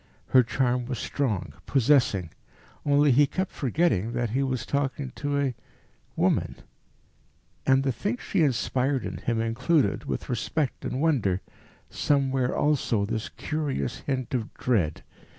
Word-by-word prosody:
Her 130 - +7
charm 125 0 0
was 130 -2 -3
strong, 110 -12 -2
possessing; 125 - +3 0.5
only 145 0 +4
he 140 +3 +5
kept 185 +5 -2
forgetting 120 - 0
that 120 -2 -1
he 130 +4 +1
was 130 -3 -1
talking 140 -1 -2
to 145 -1 -1
a 135 -3 0 0.6
woman; - - +1 1.1
and 135 0 +5
the 135 - +1
thing 205 - -2
she 195 -6 -1
inspired 130 -1 +1
in - - -4
him 115 -1 -1
included, 125 +7 +1
with - - -3
respect 135 +3 -2
and 130 - -2
wonder, 115 - +2 0.5
somewhere 135 -3 +1
also 130 -8 +1
this 110 +1 -3
curious 150 -3 -3
hint 130 -4 -3
of 120 -3 -2
dread. 95 -12 0
130 Hz, 135 wpm, -26 LUFS, 115-145 Hz, 1.1 s, Her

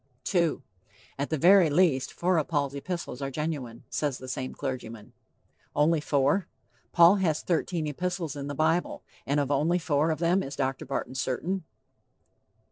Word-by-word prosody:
II. 170 -3 +1 0.6
"At 140 - -1
the 155 - 0
very 175 +2 +6
least, 145 -4 +2
four 180 -1 +1
of 150 - -2
Paul's 140 -4 0
epistles 145 -2 -5
are 135 - -2
genuine," 135 -5 -4
says 145 -4 -1
the 130 - -10
same 130 0 -4
clergyman. 115 -6 -6 0.6
Only 155 +1 +3
four? 145 +6 +1 0.4
Paul 170 +4 +7
has 165 -5 0
thirteen 170 -1 -1
epistles 170 +1 -3
in 140 -1 -5
the 145 - -4
bible, 160 +4 0 0.2
and 140 +2 +2
of 140 -1 -1
only 155 +5 +2
four 155 -2 +1
of 160 - 0
them 175 +4 +2
is 135 -3 -6
Dr. 135 -1 -2
Barton 130 -1 -3
certain. 155 +8 -2
150 Hz, 160 wpm, -28 LUFS, 135-170 Hz, 0.6 s, Paul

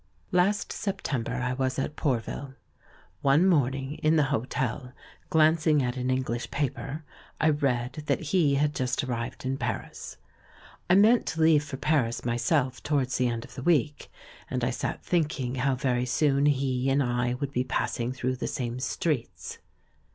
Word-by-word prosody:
Last 190 +3 +2
September 140 - -3
I 125 0 -1
was 130 0 -1
at 150 +2 -2
Pourville. 135 0 -2 0.7
One 140 +6 +4
morn 140 -8 +3
ing 135 +1 -4
in 155 +1 +2
the 155 - +4
hotel, 125 +1 -2 0.4
glancing 155 -2 +4
at 125 0 -1
an 125 0 -2
English 130 -2 -1
paper, 145 +2 -3 0.4
I 155 - +4
read 130 -1 -1
that - - +2
he 155 -3 +2
had 145 +1 +1
just 130 -1 -1
arrived 120 -1 -4
in 135 +1 -1
Paris. 115 -4 -5 0.7
I 180 - +6
meant 220 +4 +5
to 160 0 -2
leave 160 -2 +5
for 145 -3 -6
Paris, 130 -7 0
myself, 125 +2 0
towards 140 -4 0
the 125 - +3
end 115 -1 -3
of 125 - -15
the 130 - -7
week, 150 -1 +1 0.4
and 125 -1 -2
I 125 - +1
sat 125 - -4
thinking 150 -7 0
how 135 +1 +1
very 125 -1 0
soon 140 +2 +2
he 135 -2 +1
and 140 +1 +3
I 120 0 0
would 140 +1 -4
be 125 -2 0
passing 120 -1 -1
through 130 0 -2
the - - -3
same 120 -1 -3
streets. 145 -1 -3
135 Hz, 165 wpm, -27 LUFS, 125-150 Hz, 0.7 s, I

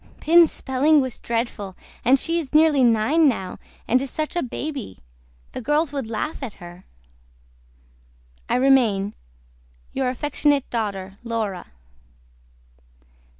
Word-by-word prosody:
PINS 335 +1 +5
SPELLING 285 +4 +2
WAS 260 -4 -3
DREADFULL 230 -5 -3 0.3
AND 260 +3 +5
SHE 330 +5 0
IS 300 -2 -6
NEARLY 305 -3 +5
NINE 245 +8 +4
NOW 190 -7 -4 0.3
AND 255 +2 +3
IS 275 - -4
SUCH 310 +5 -4
A 345 - +1
BABY 265 - -5 0.5
THE - - -6
GIRLS 295 +5 +1
WOULD 275 -5 -4
LAUGH 230 +8 -3
AT 245 -6 -5
HER. 175 +1 -13 1.6
I - - +2
REMAIN 240 -7 +3 0.8
YOUR 265 -1 0
AFECTIONATE 290 +1 0
DAUGHTER 200 -4 -3
LAURA. 220 -6 -3
255 Hz, 120 wpm, -23 LUFS, 220-295 Hz, 1.6 s, PINS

